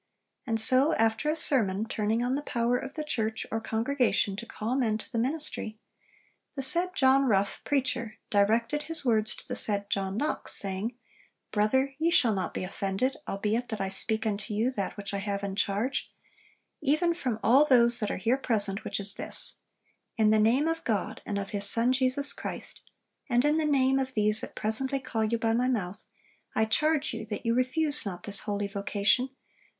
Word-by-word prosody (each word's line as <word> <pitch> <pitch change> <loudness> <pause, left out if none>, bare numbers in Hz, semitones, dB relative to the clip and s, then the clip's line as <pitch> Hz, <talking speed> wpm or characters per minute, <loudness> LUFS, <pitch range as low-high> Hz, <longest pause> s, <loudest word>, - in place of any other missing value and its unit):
And 225 -1 0
so, 260 +7 +3
after 225 +6 +1
a 305 - +1
sermon 220 -10 +1
turning 220 +1 -1
on 250 +1 0
the 285 - -1
power 240 -3 0
of 265 +2 -5
the 310 - -3
church 220 -6 -2
or 225 - -2
congregation 225 -3 0
to 230 - -7
call 225 +4 -3
men 230 -5 +1
to 220 - -11
the 230 - -1
ministry, 255 -4 -3 0.8
'The 270 - -3
said 360 +6 +3
John 270 -1 +4
Rough, 200 -4 +1
preacher, 260 -5 -1
directed 225 +8 +2
his 320 -2 +2
words 220 -3 +2
to - - -11
the - - -4
said 200 -1 -1
John 195 0 -1
Knox, 300 +5 -1
saying, 200 +4 0 0.6
"Brother, 265 +6 +1
ye 325 +1 +2
shall 250 -9 +3
not 190 -3 -2
be - - -4
offended, 195 +7 -2
albeit 215 +5 -2
that 220 -3 -4
I 195 - -2
speak 220 +3 +1
unto 210 0 -2
you 230 +5 +1
that 200 -6 -4
which 200 0 -6
I 200 - -1
have 200 0 -3
in 195 -1 -3
charge, 210 +7 -1 0.7
even 310 +4 +2
from 255 -10 -3
all 255 +7 +6
those 240 -4 +5
that 210 - -1
are - - -2
here 230 +7 +1
present, 210 -6 +2
which - - -3
is 200 0 -3
this: - - -1 0.6
In 215 -1 +4
the 215 - +4
name 245 +8 +3
of 325 0 -2
God, 215 -4 -2
and 205 - -2
of 200 -1 -4
His 200 -1 +2
Son 235 +4 +3
Jesus 260 +2 +4
Christ, - - -7 0.5
and 245 +2 +2
in 300 +1 +3
the 315 - 0
name 270 -2 +3
of 265 -1 -3
these 215 0 +2
that - - -8
presently 265 +6 0
call 225 -4 -2
you 230 +2 0
by 225 0 0
my 245 +2 +1
mouth, 205 -5 -3 0.5
I 220 - +3
charge 305 +6 +1
you 225 - -5
that 210 +3 -5
you 230 - +2
refuse 290 +4 +1
not 190 -4 -6
this 205 -1 -4
holy 205 -1 -3
vocation, 200 +4 +1
but 265 - -33
230 Hz, 195 wpm, -28 LUFS, 210-265 Hz, 0.8 s, all